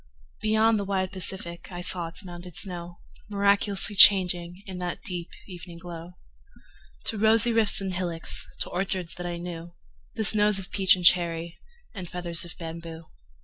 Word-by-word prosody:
Beyond 220 +1 +2
the - - -3
wide 190 -1 -2
Pacific 185 -2 -1
I 175 -1 -7
saw 175 -1 +1
its 165 +4 -6
mounded 175 -1 -10
snow 175 -3 -3 0.3
Miraculously 200 0 0
changing 180 -2 +5
In 185 -2 -8
that 175 -1 -6
deep 175 -2 -5 0.2
evening 175 -2 -11
glow, 170 0 -10 0.9
To 220 - 0
rosy 225 +2 +4
rifts 220 -3 +4
and 190 -1 -4
hillocks, 175 -2 -3
To - - 0
orchards 185 -1 -3
that 175 0 -6
I 175 -1 -5
knew, 170 0 -9 0.4
The - - -2
snows 210 -1 +5
or - - -5
peach 190 -2 +3
and 180 -1 -6
cherry, 170 -1 +2 0.3
And 185 -6 -8
feathers 175 -1 +1
of 170 - -8
bamboo. 165 -1 -9
180 Hz, 160 wpm, -25 LUFS, 170-200 Hz, 0.9 s, changing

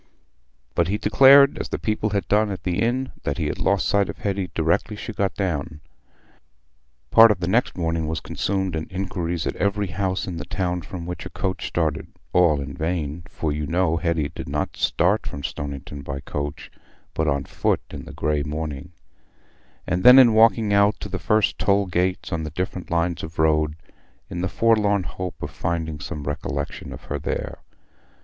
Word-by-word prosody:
But 85 - +2
he 100 +3 0
declared, 135 +6 +6
as - - -4
the - - -2
people 110 -1 -1
had 100 -1 -1
done 105 +1 +3
at 95 - -5
the 90 -2 -1
inn, 125 +3 0
that - - -2
he - - -1
had - - -3
lost - - +1
sight 100 -1 +2
of - - -6
Hetty 95 -2 -2
directly 85 +6 +1
she 110 +2 -6
got 100 -2 -1
down. 85 -5 -2 1.3
Part 115 +1 +9
of 105 -4 +1
the 85 - -2
next 115 +4 +1
morning 80 -2 -1
was 80 0 -2
consumed 95 -2 -2
in 80 0 -4
inquiries 90 -3 -3
at - - -2
every 100 +1 0
house 95 +1 -1
in 90 -3 -5
the - - -5
town 90 -2 -2
from 85 +1 -7
which 90 -1 -5
a - - -9
coach 95 -2 -3
started—(all 80 0 0
in 70 0 -5
vain, 80 -1 -3
for 80 - -2
you 75 0 -3
know 85 +1 +1
Hetty 85 -4 0
did - - -7
not 75 +2 -2
start - - +1
from 70 - -6
Stoniton 70 0 -5
by 70 0 -5
coach, 70 +1 -5 0.4
but 80 - 0
on 70 -2 +1
foot - - 0
in - - -7
the - - -9
grey 75 -1 0
morning)—and 80 +3 -7
then 125 +1 +10
in 125 -4 +8
walking 110 -1 +4
out 100 +1 +4
to - - -5
the - - -3
first 105 -1 +1
toll 100 0 +3
gates 90 0 -1
on 85 - -1
the 80 - -4
different 90 +3 -4
lines 85 0 0
of 80 +1 -8
road, 75 -1 +2 0.6
in 85 - -3
the 95 - -1
forlorn 105 -3 +2
hope 90 0 -6
of - - -4
finding 80 -2 -3
some 75 0 -6
recollection 75 +1 -4
of - - -9
her - - -4
there. - - -4
90 Hz, 185 wpm, -23 LUFS, 80-100 Hz, 1.3 s, then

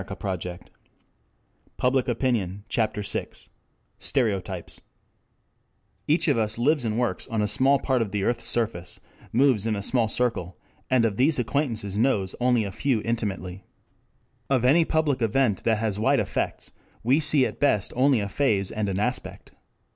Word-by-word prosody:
THE - - -7
DETECTION 90 -2 -5 1.2
OF 125 +1 +1
STEREOTYPES 120 -7 0
CHAPTER 110 -3 -1
VI - - -2 0.7
STEREOTYPES 100 -8 -1
1 - - -39 1.2
Each 155 +4 +2
of 140 -6 +3
us 110 -1 0
lives 140 +3 +2
and 110 -1 -1
works 120 -1 -1
on 110 -2 -1
a - - +1
small 130 +7 +3
part 130 -3 0
of 110 - -1
the 100 -1 -1
earth's 115 +1 0
surface, 110 -7 -1 0.3
moves 120 -4 +3
in 110 - 0
a 100 - -4
small 120 +1 +2
circle, 110 -7 -2 0.3
and 125 -3 +3
of 105 -3 -1
these 140 +5 +3
acquaintances 115 -6 -2
knows 105 -7 +1
only 125 -2 +2
a 100 - -4
few 120 0 0
intimately. 100 -5 -3 0.9
Of 130 -3 +2
any 160 +6 +5
public 155 -5 0
event 115 -2 +1
that 110 -2 +3
has 105 -2 -2
wide 110 - +3
effects - - -3 0.3
we 130 +6 +3
see 145 -3 +3
at - - -5
best 105 -9 +1
only 130 -2 +3
a 100 - -2
phase 100 -5 0
and 105 -2 -2
an 95 0 -2
aspect. 125 +4 -3
115 Hz, 160 wpm, -25 LUFS, 100-130 Hz, 1.2 s, any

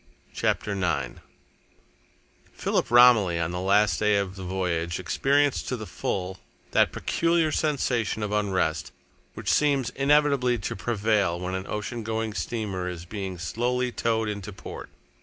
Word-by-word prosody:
CHAPTER 105 - 0
IX 85 -10 -1 1.3
Philip - - -1
Romilly, 115 -8 +6
on 85 0 -1
the 90 - -3
last 100 +3 +3
day 105 -1 +3
of 100 -1 -2
the 95 - -9
voyage, 90 -2 -2
experienced 140 +9 +1
to 125 - -2
the 110 - -6
full 95 -2 -3 0.3
that - - +3
peculiar 165 -2 +1
sensation 125 -9 0
of 105 - -3
unrest 95 -8 0 0.4
which - - -1
seems 140 -4 +2
inevitably 140 -3 +3
to 100 - -4
prevail 105 -5 0
when 90 +1 -4
an 95 0 -4
oceangoing 110 0 -3
steamer 100 -6 -3
is 85 -1 -7
being 95 -1 -5
slowly 125 +8 -1
towed 115 -2 0
into 105 -1 -5
port. 95 - -9
105 Hz, 140 wpm, -26 LUFS, 95-120 Hz, 1.3 s, Romilly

